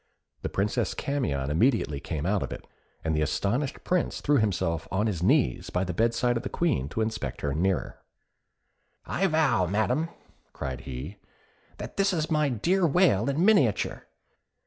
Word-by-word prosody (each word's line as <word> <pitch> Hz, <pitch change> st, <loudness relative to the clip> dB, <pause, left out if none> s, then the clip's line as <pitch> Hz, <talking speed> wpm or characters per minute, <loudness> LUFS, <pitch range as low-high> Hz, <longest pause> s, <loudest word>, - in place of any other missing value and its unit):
The -, -, -3 dB
Princess 100 Hz, +2 st, -1 dB
Camion 75 Hz, -, -1 dB
immediately 85 Hz, -, +2 dB
came 75 Hz, +1 st, -4 dB
out 100 Hz, +1 st, +1 dB
of -, -, -4 dB
it, -, -, -7 dB, 0.4 s
and 80 Hz, -1 st, 0 dB
the 75 Hz, -, +1 dB
astonished 100 Hz, -, -1 dB
Prince 180 Hz, -1 st, 0 dB
threw 145 Hz, -1 st, +2 dB
himself 85 Hz, -, 0 dB
on 100 Hz, +2 st, 0 dB
his 95 Hz, -7 st, -1 dB
knees 65 Hz, -8 st, +2 dB
by 90 Hz, -, 0 dB
the 90 Hz, -1 st, -3 dB
bed 115 Hz, +5 st, +1 dB
side 120 Hz, 0 st, +1 dB
of -, -, -3 dB
the -, -, -5 dB
Queen 145 Hz, -, 0 dB
to 110 Hz, -, -2 dB
inspect 110 Hz, -, -3 dB
her 70 Hz, -1 st, -1 dB
nearer. 95 Hz, +5 st, -1 dB, 1.1 s
"I 195 Hz, -, +1 dB
vow, 145 Hz, -, +2 dB
Madam," 125 Hz, -, 0 dB, 0.4 s
cried 65 Hz, -2 st, -5 dB
he, 70 Hz, +10 st, -6 dB, 0.6 s
"that -, -, -8 dB
this 195 Hz, -1 st, +2 dB
is 160 Hz, -2 st, -1 dB
my 150 Hz, -2 st, +2 dB
dear 170 Hz, -, +1 dB
Whale 140 Hz, -, +3 dB
in 150 Hz, +6 st, +1 dB
miniature. 150 Hz, -, +2 dB
110 Hz, 170 wpm, -27 LUFS, -, 1.1 s, Whale